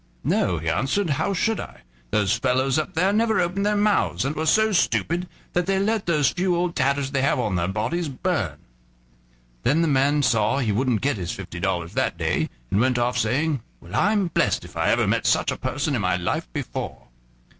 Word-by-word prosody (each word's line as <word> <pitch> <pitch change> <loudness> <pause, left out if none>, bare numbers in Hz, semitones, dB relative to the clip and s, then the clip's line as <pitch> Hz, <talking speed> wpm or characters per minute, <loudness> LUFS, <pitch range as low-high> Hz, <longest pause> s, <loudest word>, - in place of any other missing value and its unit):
"No," 90 - +1
he 80 +1 -5
answered, 135 - 0
"how 140 - 0
should 220 +3 0
I? - - -8 0.3
Those 105 - +2
fellows 130 +3 +1
up 155 - -4
there 185 +5 +2
never 220 +1 +2
opened 180 +3 0
their 210 - +2
mouths, 205 -8 +1
and 145 +3 -2
were 160 +1 -2
so 220 +6 +4
stupid 180 -1 +1 0.3
that 175 0 0
they 195 0 +2
let 210 +1 0
those 150 -7 +3
few 180 0 0
old 175 0 -1
tatters 140 0 0
they 140 - 0
have 135 -1 +2
on 105 -6 -1
their 85 -1 0
bodies 115 - -2
burn." 130 - -2 1.0
Then 155 - +2
the - - +2
man 145 +1 +2
saw 115 +1 +2
he 120 -6 0
wouldn't 120 +1 +1
get 140 -4 0
his 85 -3 -4
fifty 90 -3 -7
dollars 90 -2 -2
that - - 0
day, - - 0 0.2
and 100 - +2
went 125 0 +2
off, 120 +1 0
saying: 135 +4 0 0.2
"Well, - - -14
I'm 205 -2 +2
blessed - - +1
if - - -14
I - - +1
ever - - +3
met - - +1
such - - +2
a - - -2
person 145 +1 -2
in 120 - 0
my 90 -2 +1
life 85 -8 -2
before." - - -6
140 Hz, 210 wpm, -23 LUFS, 110-175 Hz, 1.0 s, so